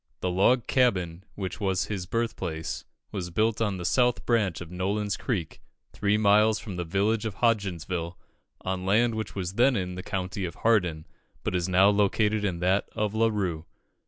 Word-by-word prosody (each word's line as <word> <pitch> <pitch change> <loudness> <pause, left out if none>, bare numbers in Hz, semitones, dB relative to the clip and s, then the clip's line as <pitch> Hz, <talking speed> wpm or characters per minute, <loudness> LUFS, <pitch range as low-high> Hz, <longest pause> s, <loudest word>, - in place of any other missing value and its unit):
The 90 - 0
log 110 +7 +3
cabin 95 -8 +1
which 95 0 -5
was 95 -3 0
his 95 -4 -4
birth 115 +2 -1
place 80 -1 -4 0.3
was 90 -3 -4
built 110 +5 +1
on 105 -4 0
the 90 - -5
south 125 +2 +2
branch 105 -9 +1
of 85 -1 -9
Nolin's 100 +3 -1
Creek, 90 -11 -3 0.3
three 105 0 +1
miles 105 +1 +4
from 105 -3 -7
the 90 - -2
village 100 +6 0
of 110 -4 -3
Hodgensville, 90 -7 -1 0.4
on 95 0 -3
land 110 +5 +3
which 110 0 -4
was 95 -2 -3
then 125 +5 +4
in 90 -3 -2
the 90 - -5
county 95 0 -3
of 85 - -4
Hardin, 90 -9 +1 0.4
but - - -2
is 90 0 0
now 95 +2 +5
included 105 +1 +2
in 90 -4 -1
that 95 +3 +1
of 105 -2 -1
La 115 +1 +3
Rue. 90 -7 -2
100 Hz, 185 wpm, -27 LUFS, 90-110 Hz, 0.4 s, now